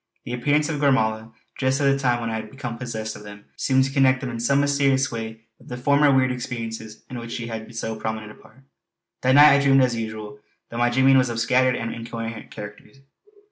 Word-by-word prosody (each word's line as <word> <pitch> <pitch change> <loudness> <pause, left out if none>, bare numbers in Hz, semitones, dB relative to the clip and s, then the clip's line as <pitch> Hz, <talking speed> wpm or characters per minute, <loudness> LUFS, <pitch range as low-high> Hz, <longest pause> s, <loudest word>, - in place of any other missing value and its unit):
The 120 - -5
appearance 145 +5 +1
of 150 -3 -3
Gormala 110 -5 +1 0.3
just 130 +1 +1
at - - 0
the 140 0 +3
time 120 -3 +1
when 115 -1 -3
I 110 - -2
had 110 -1 -7
become 130 -4 -6
possessed 110 -3 -5
of - - -11
them 105 0 -12
seemed 130 -1 +2
to 135 - -3
connect 135 -2 +3
them 130 -2 -4
in 115 - -5
some 140 +4 +2
mysterious 140 -2 +2
way 110 -1 -6 0.2
with - - -19
the 125 - -6
former 140 +3 +3
weird 130 -1 +3
experiences 115 -3 -6
in 125 - -5
which 115 0 -7
she 120 - -4
had 115 0 -7
so 110 0 -3
prominent 110 -1 -5
a - - -17
part. 130 +4 -20 0.6
That 130 +1 +3
night 145 +1 +9
I 140 - +4
dreamed 135 -1 +5
as 125 -2 +1
usual, 110 -2 -6 0.3
though 115 - -5
my 120 0 +3
dreaming 130 +2 +4
was 130 -1 +1
of 115 - -3
a - - -2
scattered 125 +2 +2
and 115 - -4
incoherent 115 0 -7
character. 105 -1 -10
120 Hz, 230 wpm, -23 LUFS, 110-135 Hz, 0.6 s, night